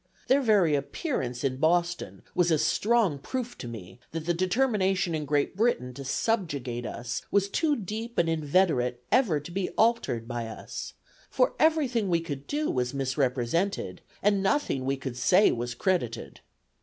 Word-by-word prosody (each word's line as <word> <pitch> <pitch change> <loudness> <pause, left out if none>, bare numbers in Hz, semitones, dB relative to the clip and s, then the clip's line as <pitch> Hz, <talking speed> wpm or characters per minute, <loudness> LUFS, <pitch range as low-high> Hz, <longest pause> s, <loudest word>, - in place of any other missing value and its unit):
Their 275 +2 +5
very 205 - +4
appearance 140 - -2
in 130 -2 0
Boston 175 +4 0
was 180 -1 +2
a 160 - +4
strong 185 +2 +2
proof 245 - -4
to 120 - -6
me, 95 -5 -9
that 165 -1 -4
the 175 - +1
determination 190 -1 +1
in 155 -1 -2
Great 145 +3 0
Britain 195 - +1
to 140 - -8
subjugate 135 - -1
us 120 +2 -4
was 200 -1 +2
too 295 +8 +1
deep 225 +2 -5
and 170 - +3
inveterate 150 -6 +1
ever 215 - +3
to 150 +4 -10
be 185 +1 -2
altered 220 - +2
by 120 -2 -3
us; 110 - -7 0.3
for - - +2
every 315 -2 +4
thing 230 -5 -1
we 170 -1 +3
could 145 -4 -6
do 300 +1 -1
was 125 +1 -1
misrepresented, 135 +6 -1 0.2
and 200 -1 +3
nothing 195 - 0
we 135 +1 0
could 130 -2 -6
say 180 +11 +5
was 120 +1 -3
credited. 120 - -1
165 Hz, 165 wpm, -28 LUFS, 130-210 Hz, 0.3 s, Their